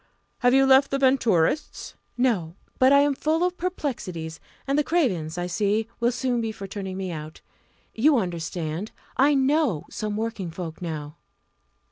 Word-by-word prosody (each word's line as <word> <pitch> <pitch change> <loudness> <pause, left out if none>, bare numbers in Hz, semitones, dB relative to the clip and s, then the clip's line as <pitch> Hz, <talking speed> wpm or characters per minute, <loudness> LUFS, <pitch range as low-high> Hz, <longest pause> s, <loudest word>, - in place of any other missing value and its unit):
"Have 245 +1 +4
you 270 0 +5
left 270 +1 +6
the 275 - 0
Venturists?" 260 - +1 0.2
"No! 200 -10 +1 0.2
but 260 +1 +6
I 280 0 +7
am 290 0 +3
full 310 +5 0
of 360 0 0
perplexities; 225 - -4 0.3
and 275 - 0
the 300 - +3
Cravens, 190 - 0
I 175 - -1
see, 205 +4 0
will 240 +1 +2
soon 245 -1 -1
be 225 -1 -2
for 205 -2 -8
turning 190 -1 -5
me 190 -2 -3
out. 155 -1 -8 0.5
You 275 +5 +4
understand 170 -1 -3 0.3
I 285 +3 +5
know 265 - +2
some 210 -1 -3
working 220 -5 -3
folk 165 0 -7
now!" 155 -3 -5
225 Hz, 160 wpm, -25 LUFS, 175-270 Hz, 0.5 s, I